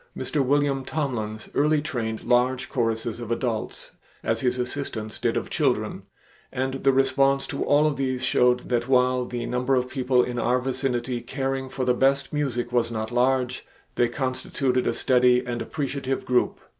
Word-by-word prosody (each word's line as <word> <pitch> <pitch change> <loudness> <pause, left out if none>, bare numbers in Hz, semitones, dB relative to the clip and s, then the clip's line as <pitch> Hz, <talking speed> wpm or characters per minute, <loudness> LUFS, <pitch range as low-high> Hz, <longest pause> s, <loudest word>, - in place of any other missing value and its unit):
Mr. 145 -3 0
William 140 0 +1
Tomlins 110 -8 -3
early 150 +1 +3
trained 115 -7 -3
large 125 +1 +2
choruses 115 -2 -1
of 120 -2 -6
adults 115 -2 -3 0.3
as 115 0 0
his 125 -1 +1
assistants 125 -4 -4
did - - 0
of - - -4
children, - - 0 0.5
and 130 +1 -3
the 135 - +5
response 135 +1 +2
to 140 - -3
all 145 +1 +4
of 150 -2 +1
these 130 -2 -1
showed 125 -1 +3
that 120 -1 -1
while 125 -1 +3
the 120 -1 -4
number 125 +2 0
of 125 0 +1
people 130 -1 +2
in 120 -1 -3
our 120 +2 +2
vicinity 125 -2 -2
caring 135 -1 -3
for 130 0 -3
the 125 - +3
best 135 +4 +1
music 135 -6 -1
was 120 -1 +1
not 110 0 -3
large, 125 +1 +1 0.3
they 120 - +2
constituted 130 0 -1
a - - +2
steady 125 0 +3
and 120 -1 -3
appreciative 135 +1 -3
group. 125 -1 +1
125 Hz, 170 wpm, -25 LUFS, 120-135 Hz, 0.5 s, the